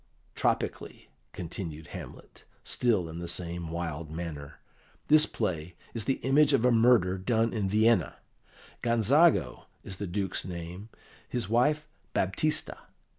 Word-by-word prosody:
Tropically," - - -2 0.2
continued 80 -2 -7
Hamlet, - - -10 0.2
still 110 -8 +1
in 80 +1 -7
the 85 - -5
same 85 0 -2
wild 85 -2 -4
manner. 80 -3 -7 0.5
"This 155 0 +7
play 90 -5 -3 0.2
is 115 -3 -2
the 135 - +1
image 145 +2 +4
of 125 -3 +3
a 125 - +5
murder 115 -6 +4
done 115 +4 +1
in 105 -4 -1
Vienna; 110 +3 +3 0.7
Gonzago 115 - +3 0.2
is 95 - -7
the 100 - -4
Duke's 95 +1 -1
name, 90 +3 -7 0.4
his 120 -5 -3
wife 150 +6 +2 0.3
Baptista. 95 +12 0
95 Hz, 125 wpm, -29 LUFS, 85-120 Hz, 0.7 s, This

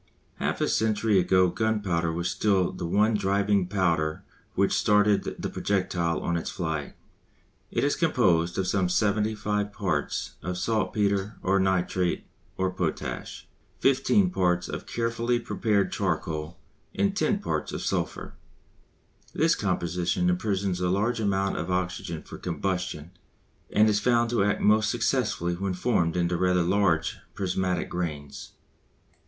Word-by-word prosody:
Half - - -2
a - - +2
century 110 -2 +2
ago 90 0 +4
gunpowder 95 -4 0
was 85 +1 -2
still 95 -1 +1
the 85 - -5
one 105 +5 +3
driving 100 -1 +1
power 85 -5 0 0.3
which 100 +1 +2
started 105 -1 +2
the - - -3
projectile 90 -4 -1
on 85 - -1
its 85 - -4
flight. 80 -4 -4 0.7
It - - -1
is 145 - +2
composed 90 - +2
of 95 - 0
some 90 -1 +1
75 105 +1 0
parts - - -2
of 90 +2 -4
saltpetre 100 0 0
or 95 +1 +2
nitrate 95 -1 0 0.3
of 95 -1 -1
potash, 85 -4 -4 0.3
15 180 +8 +3
parts 90 - +1
of - - -6
carefully 115 +1 0
prepared 110 -4 0
charcoal, 80 +1 -2 0.4
and 200 0 +1
10 210 0 +1
parts 205 - -3
of - - -4
sulphur. - - -2 1.0
This 165 +1 +3
composition 90 -2 0
imprisons 95 -1 -1
a 90 - +1
large 110 +6 +1
amount 100 -2 0
of - - -3
oxygen 90 -2 -2
for - - -10
combustion 90 -4 -3 0.6
and 110 +1 +5
is 105 -1 +3
found 120 +1 +2
to 115 -5 +2
act 105 +1 +1
most 110 0 +4
successfully 85 +1 0
when 95 +1 -2
formed 90 -5 +1
into 90 0 +1
rather 90 0 +2
large 90 -3 +1 0.2
prismatic 90 -2 -1
grains. 75 -5 -5
95 Hz, 135 wpm, -27 LUFS, 90-105 Hz, 1.0 s, and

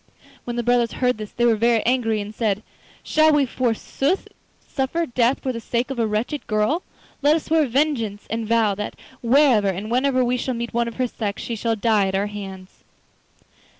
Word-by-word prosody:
When 240 - -4
the 240 - -1
brothers 240 -1 +2
heard 250 -3 0
this 215 -1 -6
they 240 - 0
were 230 -2 +4
very 230 +1 +2
angry, 230 -3 +1
and 205 +1 -7
said: 215 -2 -1 0.4
'Shall 310 0 +4
we 290 -2 +4
forsooth 260 - -1 0.4
suffer 285 +5 -1
death 245 -1 +1
for 260 - 0
the 230 - -4
sake 235 +3 -2
of 260 - -4
a 225 - +2
wretched 225 +8 -2
girl? 215 +10 +1 0.4
Let 295 +2 +5
us 320 - -2
swear 315 -2 +2
vengeance, 235 -6 0
and 225 -1 -2
vow 225 -2 +3
that 210 +2 -5 0.3
wherever 240 -4 +4
and 195 +4 -4
whenever 255 0 +2
we 250 +1 +1
shall 255 0 -2
meet 235 0 -4
one 235 0 +1
of 230 - -6
her 255 - 0
sex, 210 -4 -4
she 235 - -3
shall 225 +1 0
die 215 -2 +2
at 190 - -2
our 195 +1 +1
hands. 195 -2 -9
235 Hz, 200 wpm, -22 LUFS, 215-260 Hz, 0.4 s, Let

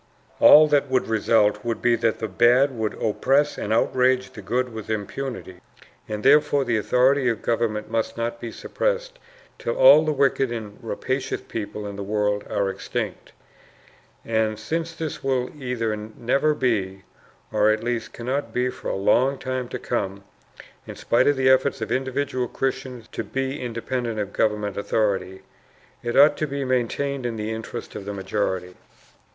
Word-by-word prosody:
All 155 +1 +9
that 145 -2 +2
would 130 -1 +1
result, 105 -1 +2
would 115 -1 -2
be 120 -1 +3
that 115 -1 +1
the 110 - -3
bad 120 +6 +3
would 110 -2 -2
oppress 135 +7 +1
and 105 - -4
outrage 130 +3 +2
the - - -9
good 125 0 -1
with 110 -1 -7
impunity. 110 -2 -5 0.5
And 105 0 -4
therefore 145 -1 +4
the 120 -2 +1
authority 125 +5 +3
of 115 -3 -3
government 115 -2 -1
must 115 0 -2
not 115 0 -3
be 115 - -5
suppressed - - -2 0.4
till - - -2
all - - +8
the 155 - 0
wicked 135 -3 +1
and 110 -3 -6
rapacious 130 +3 -3
people 105 -1 -6
in 100 -1 -6
the 100 - -4
world 105 0 0
are 100 - 0
extinct. 95 0 -5 0.9
And 110 -1 0
since 165 +9 -3
this 160 -2 -5
will 130 -2 0
either 115 -4 -1
never 120 +8 0
be, 100 -8 -1 0.5
or 105 0 +3
at 110 +1 +1
least 120 -1 -2
cannot 130 +4 -3
be 125 +1 0
for - - -9
a - - -1
long 130 +7 +2
time 130 -1 -3
to - - -5
come, 100 -4 -3 0.6
in - - -7
spite 120 +2 +2
of 145 - +4
the 130 0 +2
efforts 130 +1 +3
of 110 0 -4
individual 130 0 -1
Christians 130 -2 -4
to - - -4
be 135 +2 -3
independent 120 -1 -3
of 100 -1 -3
government 105 -2 0
authority, 100 -2 -1 0.6
it 120 0 -2
ought 145 +2 +7
to 155 - -1
be 140 -1 -3
maintained 130 +2 -1
in 120 -2 -2
the 110 0 -3
interests 110 0 -6
of 100 - -7
the 100 - -4
majority. 95 -2 -2
120 Hz, 170 wpm, -23 LUFS, 105-135 Hz, 0.9 s, All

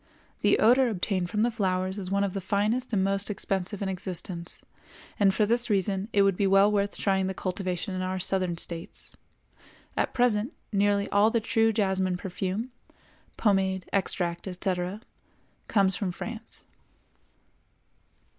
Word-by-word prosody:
The - - +4
odor 250 +3 +5
obtained 185 -3 -1
from 210 +2 +1
the 240 - +2
flowers 190 -2 -1
is 185 -2 -5
one 200 +1 +1
of 195 -2 -1
the 195 - -3
finest 210 +7 0
and 195 -4 +2
most 195 +1 +1
expensive 195 0 -2
in - - -1
existence, 180 -2 -5 0.6
and 200 -2 +5
for 210 +2 +2
this 240 +3 +1
reason 195 -1 +1
it 200 - +4
would 195 -1 +3
be 200 +1 +1
well 195 +2 +5
worth 200 -1 0
trying 190 -1 +1
the 190 - -3
cultivation 185 0 -3
in 185 - -2
our 185 0 -2
southern 185 -2 0
States. 165 0 -5 0.8
At - - 0
present 240 -2 +1 0.2
nearly 200 0 +2
all 205 +2 +4
the 230 - +1
true 225 0 +2
jasmine 190 -4 0
perfume 190 +6 -3 0.7
(pomade, 190 -3 +1
extract, 175 -2 -1
etc.) 185 +1 -3 0.7
comes 195 -3 +3
from 190 -2 -2
France. 225 +5 -8
195 Hz, 150 wpm, -27 LUFS, 185-210 Hz, 0.8 s, odor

